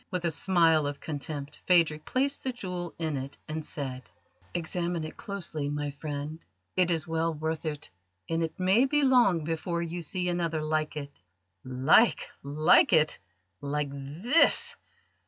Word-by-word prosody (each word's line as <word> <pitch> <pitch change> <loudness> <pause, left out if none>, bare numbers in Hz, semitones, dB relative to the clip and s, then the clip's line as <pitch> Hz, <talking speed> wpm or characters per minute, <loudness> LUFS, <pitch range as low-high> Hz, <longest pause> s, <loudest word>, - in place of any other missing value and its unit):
With 180 -2 -2
a 170 - +2
smile 165 -3 +3
of 145 0 -4
contempt 145 -1 -6
Phadrig 160 -4 +3
placed 275 +2 0
the 260 - -1
jewel 180 -7 -5
in 160 -3 -2
it, 135 +1 -5
and 155 0 -4
said: 130 -7 -6 0.5
"Examine 170 0 -2
it 155 - -7
closely, 170 -7 -4
my 145 0 -2
friend. 145 +2 -6 0.3
It 180 -1 +3
is 165 -2 0
well 165 0 0
worth 160 +1 -3
it, 150 -2 -5 0.4
and 165 0 0
it 160 +1 -3
may 190 +8 +4
be 295 +2 +2
long 240 - +4
before 165 +2 -2
you 170 +1 -4
see 180 +3 -2
another 170 -3 -1
like 155 0 -1
it." 140 -1 -7 0.4
"Like 130 - +3
like 145 +3 +4
it, 155 -2 +4 0.4
like 145 0 -2
this! 215 - +2
160 Hz, 155 wpm, -28 LUFS, 150-180 Hz, 0.5 s, may